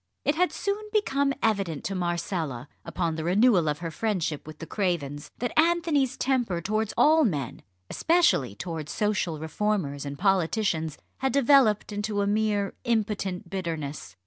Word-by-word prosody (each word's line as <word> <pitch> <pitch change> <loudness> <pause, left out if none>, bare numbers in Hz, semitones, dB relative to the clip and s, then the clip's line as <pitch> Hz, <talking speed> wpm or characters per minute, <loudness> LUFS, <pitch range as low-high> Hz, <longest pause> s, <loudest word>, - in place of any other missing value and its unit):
It 290 - +3
had 360 +3 +2
soon 405 +1 -2
become 280 -10 +1
evident 195 -9 0
to 195 - -3
Marcella, 170 -7 -2 0.2
upon 170 -3 -2
the 160 0 -4
renewal 185 -1 +4
of 150 - -1
her 165 - -3
friendship 170 -6 -2
with 155 -1 -9
the 165 - -7
Cravens, 160 -7 -2
that 245 - -2
Anthony's 320 -5 +2
temper 245 -10 0
towards 215 +4 -1
all 315 +1 +5
men, 140 - -2 0.3
especially 330 - +2
towards 160 - -5
social 205 -6 0
reformers 160 -2 -2
and 140 0 -6
politicians, 180 -3 +1 0.2
had 265 0 0
developed 265 -7 +4
into 205 0 -2
a - - +1
mere 205 -1 +1
impotent 210 -6 -1
bitterness. 160 - -4
195 Hz, 145 wpm, -27 LUFS, 160-235 Hz, 0.3 s, all